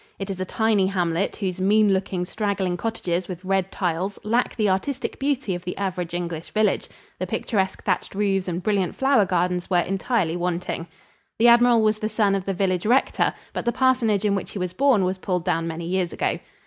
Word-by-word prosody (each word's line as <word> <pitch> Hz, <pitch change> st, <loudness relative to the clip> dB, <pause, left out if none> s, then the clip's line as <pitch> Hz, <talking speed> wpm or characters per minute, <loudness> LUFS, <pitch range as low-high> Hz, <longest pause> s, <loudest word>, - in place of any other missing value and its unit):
It 195 Hz, 0 st, -4 dB
is 190 Hz, -, -6 dB
a 185 Hz, -, -1 dB
tiny 215 Hz, -1 st, +2 dB
hamlet, 180 Hz, -1 st, 0 dB
whose 185 Hz, -3 st, -3 dB
mean 205 Hz, +1 st, +4 dB
looking, 190 Hz, -1 st, -1 dB
straggling 195 Hz, -2 st, -1 dB
cottages 180 Hz, -3 st, -2 dB
with 185 Hz, 0 st, -7 dB
red 195 Hz, 0 st, 0 dB
tiles 185 Hz, +2 st, -2 dB
lack 230 Hz, +4 st, 0 dB
the 215 Hz, -2 st, +1 dB
artistic 220 Hz, +8 st, -1 dB
beauty 270 Hz, -7 st, 0 dB
of 175 Hz, 0 st, -5 dB
the 180 Hz, -, -5 dB
average 180 Hz, -3 st, -3 dB
English 170 Hz, -2 st, -4 dB
village 215 Hz, 0 st, +2 dB, 0.3 s
the -, -, -2 dB
picturesque, 190 Hz, -4 st, -1 dB
thatched 190 Hz, 0 st, -1 dB
roofs 195 Hz, -2 st, 0 dB
and 175 Hz, 0 st, -3 dB
brilliant 200 Hz, -3 st, 0 dB
flower 265 Hz, -6 st, +3 dB
gardens 180 Hz, -1 st, 0 dB
were 180 Hz, -, +3 dB
entirely 195 Hz, -2 st, 0 dB
wanting. 175 Hz, -1 st, -2 dB, 0.5 s
The 235 Hz, +2 st, +6 dB
admiral 235 Hz, -1 st, +6 dB
was 215 Hz, 0 st, +2 dB
the 215 Hz, -, -2 dB
son 210 Hz, -2 st, +2 dB
of 195 Hz, -1 st, -1 dB
the 195 Hz, -, -1 dB
village 185 Hz, 0 st, 0 dB
rector, 250 Hz, +4 st, +3 dB, 0.2 s
but -, -, -3 dB
the 235 Hz, -, +1 dB
parsonage 245 Hz, -5 st, +2 dB
in 205 Hz, -, +3 dB
which 195 Hz, -, -2 dB
he -, -, -5 dB
was 180 Hz, -1 st, -3 dB
born 260 Hz, -4 st, +3 dB
was 185 Hz, +1 st, -2 dB
pulled 180 Hz, -2 st, -2 dB
down 165 Hz, -2 st, 0 dB
many 165 Hz, +1 st, -5 dB
years 180 Hz, 0 st, -1 dB
ago. -, -, -1 dB
195 Hz, 200 wpm, -24 LUFS, 180-215 Hz, 0.5 s, The